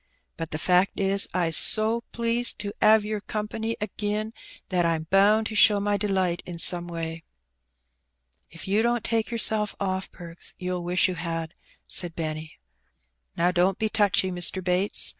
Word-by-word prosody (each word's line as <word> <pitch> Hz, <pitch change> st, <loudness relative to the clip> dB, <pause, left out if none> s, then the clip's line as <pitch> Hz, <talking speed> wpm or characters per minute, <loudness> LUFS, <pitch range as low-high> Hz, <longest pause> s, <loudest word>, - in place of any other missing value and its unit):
But 165 Hz, -1 st, -6 dB
the 155 Hz, -, -4 dB
fact 180 Hz, +4 st, +1 dB
is, 195 Hz, 0 st, +3 dB
I's 170 Hz, -3 st, 0 dB
so 220 Hz, +2 st, +4 dB
pleased 235 Hz, +1 st, -1 dB
to 205 Hz, -1 st, -3 dB
'ave 215 Hz, -1 st, +5 dB
yer 215 Hz, -1 st, -3 dB
company 220 Hz, +2 st, -4 dB
agin 210 Hz, +1 st, -3 dB, 0.4 s
that 180 Hz, -2 st, +1 dB
I'm 165 Hz, -1 st, 0 dB
bound 205 Hz, +3 st, +4 dB
to 220 Hz, -, -5 dB
show 205 Hz, -1 st, +5 dB
my 205 Hz, 0 st, 0 dB
delight 190 Hz, -4 st, -1 dB
in 175 Hz, -1 st, -8 dB
some 175 Hz, +1 st, +4 dB
way." 165 Hz, -1 st, -6 dB, 1.3 s
'^If 165 Hz, -, -8 dB
you 200 Hz, +3 st, +1 dB
don't 240 Hz, 0 st, 0 dB
take 225 Hz, -1 st, -1 dB
yourself 220 Hz, -3 st, -1 dB
off. 190 Hz, -1 st, -3 dB
Perks, 170 Hz, -1 st, -6 dB
you'll 180 Hz, -1 st, -4 dB
wish 180 Hz, +2 st, +2 dB
you 185 Hz, -, -3 dB
had," 165 Hz, -1 st, -5 dB, 0.3 s
said 175 Hz, -2 st, +1 dB
Benny. 155 Hz, -1 st, -5 dB, 0.8 s
"Now, 175 Hz, +1 st, +2 dB
don't 180 Hz, +1 st, +1 dB
be 220 Hz, -, -1 dB
touchy, 200 Hz, -3 st, +1 dB
Mr. 180 Hz, +1 st, 0 dB
Bates. 180 Hz, +3 st, 0 dB
190 Hz, 160 wpm, -25 LUFS, 175-215 Hz, 1.3 s, ave